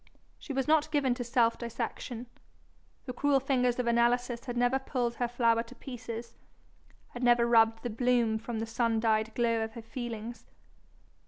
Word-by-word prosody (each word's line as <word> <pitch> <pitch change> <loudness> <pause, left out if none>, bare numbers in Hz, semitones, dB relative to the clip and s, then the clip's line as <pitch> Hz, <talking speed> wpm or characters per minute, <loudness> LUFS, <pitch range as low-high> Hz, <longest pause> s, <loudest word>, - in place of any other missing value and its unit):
She - - -8
was 270 0 -1
not 310 -1 +3
given 275 -4 +2
to 245 - -4
self 235 -1 +2
dissection. 235 0 -5 0.8
The 250 - -5
cruel 280 +2 +2
fingers 250 -2 +1
of 250 - -1
analysis 240 +1 +1
had 245 -2 -4
never 245 +2 +2
pulled 245 -3 -2
her 245 0 -1
flower 235 -1 +2
to 235 +2 -11
pieces, 235 -2 -7 0.8
had 245 - -8
never 240 -1 +4
rubbed 225 -1 +4
the 240 - -3
bloom 235 -1 +1
from 230 +1 -5
the 225 - -2
sun 225 0 0
dyed 220 -1 +1
glow 230 -2 +1
of 220 0 -5
her 230 - -9
feelings. 235 -1 -6
240 Hz, 170 wpm, -30 LUFS, 230-250 Hz, 0.8 s, never